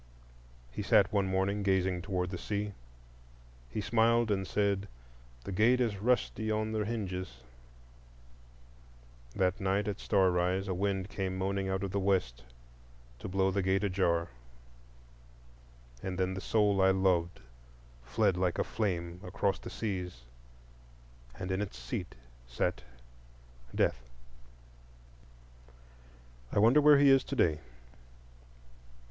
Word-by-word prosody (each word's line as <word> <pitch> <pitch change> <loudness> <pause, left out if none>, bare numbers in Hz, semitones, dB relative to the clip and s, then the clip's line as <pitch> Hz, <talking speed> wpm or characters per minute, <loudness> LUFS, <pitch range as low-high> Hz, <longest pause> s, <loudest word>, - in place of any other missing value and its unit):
He - - -5
sat 100 +1 +3
one 100 -2 +2
morning 95 +2 0
gazing 95 -2 +1
toward 90 -1 -2
the 90 - -4
sea. 105 -1 -3 1.0
He 105 - -3
smiled 115 +1 +2
and 95 -2 -1
said, 100 -1 0 0.6
"The - - -6
gate 115 +6 +3
is 115 -5 0
rusty 115 -2 0
on 110 0 -1
the 110 -1 -1
hinges." 95 - -4 1.9
That 95 +1 +1
night 95 +2 0
at 105 - -3
star 95 -3 +3
rise 90 +2 0
a 95 - -1
wind 95 +1 -1
came 95 -2 -3
moaning 95 0 -1
out 95 0 -1
of 95 - -3
the 100 - 0
west 90 -12 0 0.8
to - - -6
blow 95 +1 +1
the 100 +1 0
gate 95 +2 +1
ajar, 90 -4 +1 1.7
and 95 -1 -4
then 95 0 0
the 95 - -5
soul 105 -3 +2
I 95 - +5
loved 95 -3 +1 0.6
fled 60 +9 +1
like 90 -2 0
a - - +1
flame 90 -5 -3
across 95 +1 -1
the - - -8
Seas, 90 - -4 1.2
and 90 - -4
in 95 +2 0
its 100 -11 -5
seat - - -5 0.3
sat - - -1 0.9
Death. - - +1 2.5
I - - -3
wonder 115 +8 +6
where 150 0 +7
he 140 -1 +6
is 135 -1 +5
to 140 - -4
day? 80 - +2
95 Hz, 130 wpm, -31 LUFS, 90-105 Hz, 2.5 s, where